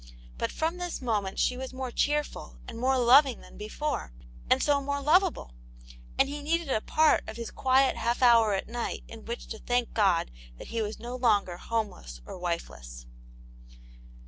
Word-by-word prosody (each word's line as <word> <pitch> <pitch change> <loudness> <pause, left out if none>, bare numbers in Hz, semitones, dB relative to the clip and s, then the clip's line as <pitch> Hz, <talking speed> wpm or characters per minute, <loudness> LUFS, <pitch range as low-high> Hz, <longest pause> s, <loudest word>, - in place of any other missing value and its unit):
But - - -1
from 325 +3 -1
this 355 -1 -4
moment 210 -6 -2
she 250 - +2
was 260 0 -6
more 260 -1 -4
cheerful 295 +4 -1
and 230 - -7
more 260 +2 +2
loving 255 +1 +5
than - - -15
before, 215 - -4 0.4
and - - +4
so 285 -1 +3
more 285 +1 -2
lovable, 320 - +2 0.6
and 270 - +4
he 290 +1 -5
needed 325 0 -1
a 220 - +1
part 310 +5 +3
of - - -7
his 235 -1 -6
quiet 265 0 +3
half 235 +2 0
hour 230 -4 +6
at 195 - -3
night 235 +1 -4
in 225 -1 -11
which 235 +1 -5
to 220 - -6
thank 245 -1 -1
God 190 - +2 0.3
that - - -10
he 230 - -2
was 215 0 -3
no 240 +2 -6
longer 210 -8 +2
homeless 200 - -4
or - - -8
wifeless. - - -5
240 Hz, 175 wpm, -28 LUFS, 215-280 Hz, 0.6 s, hour